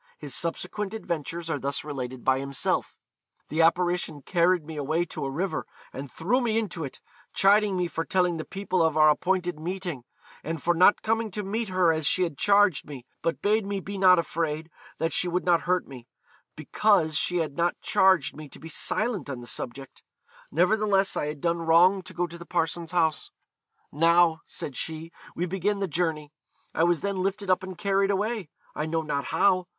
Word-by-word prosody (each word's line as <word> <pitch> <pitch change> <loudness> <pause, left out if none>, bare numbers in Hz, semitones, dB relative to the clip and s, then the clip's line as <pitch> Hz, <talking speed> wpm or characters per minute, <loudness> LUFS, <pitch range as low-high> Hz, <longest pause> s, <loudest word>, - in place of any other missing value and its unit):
His 145 -3 -6
subsequent 195 - -2
adventures 170 -4 -4
are 155 -3 -1
thus 140 +1 -2
related 130 -4 -6
by 130 0 +3
himself: 140 -1 -2 0.5
'The 160 +2 +1
apparition 175 -3 +1
carried 175 0 +2
me 160 0 -8
away 155 +4 0
to - - -6
a - - -2
river, 180 +8 -3 0.3
and 135 0 -7
threw 210 +11 0
me 225 -2 0
into 190 -7 -2
it, 135 - -7 0.3
chiding 200 0 +4
me 180 -1 0
for 165 -1 -3
telling 180 -2 +1
the 160 - -4
people 190 -1 -2
of 160 -1 +2
our 155 0 +7
appointed 180 +1 -1
meeting 175 -5 -4 0.4
and 165 0 -3
for 175 +4 +1
not 180 +4 +5
coming 225 0 0
to 210 +2 -5
meet 215 +2 -3
her 185 -3 +3
as 155 -2 -1
she 185 - +2
had 165 -5 -2
charged 200 0 +3
me; 135 -4 -9 0.2
but 165 - -2
bade 215 +2 +3
me 200 0 -3
be 200 +2 -7
not 185 -2 +6
afraid, 160 -1 -2 0.3
that 165 +1 -1
she 180 - +2
would 180 +1 -1
not 175 -2 +4
hurt 180 -1 +1
me, 125 -3 -11 0.5
because 160 +1 +2
she 180 +3 +1
had 155 -4 -2
not 170 +1 0
charged 185 -7 +3
me 150 -1 -9
to - - -13
be 160 - -9
silent 210 - -1
on 130 -3 -4
the 120 - -10
subject; 130 +2 -6 0.5
nevertheless 195 +3 +2
I 150 - -1
had 150 -1 -6
done 170 0 0
wrong 170 +4 +4
to 175 - -10
go 175 - 0
to 170 0 -10
the 170 - -11
parson's 165 -1 -1
house. 160 -4 +1 0.6
Now, 165 +1 +4
said 140 - -6
she, 160 +3 -5 0.2
we 175 - -1
begin 195 +3 -1
the 195 -1 -1
journey. 155 -2 -2 0.4
I 165 - +2
was 175 -2 +2
then 200 -1 -2
lifted 195 0 -1
up 185 - +2
and 185 -1 -8
carried 195 +1 +1
away 205 -2 -1 0.2
I 150 - -3
know 160 0 -1
not 140 -2 -2
how. 185 -2 +2
170 Hz, 195 wpm, -26 LUFS, 155-190 Hz, 0.6 s, our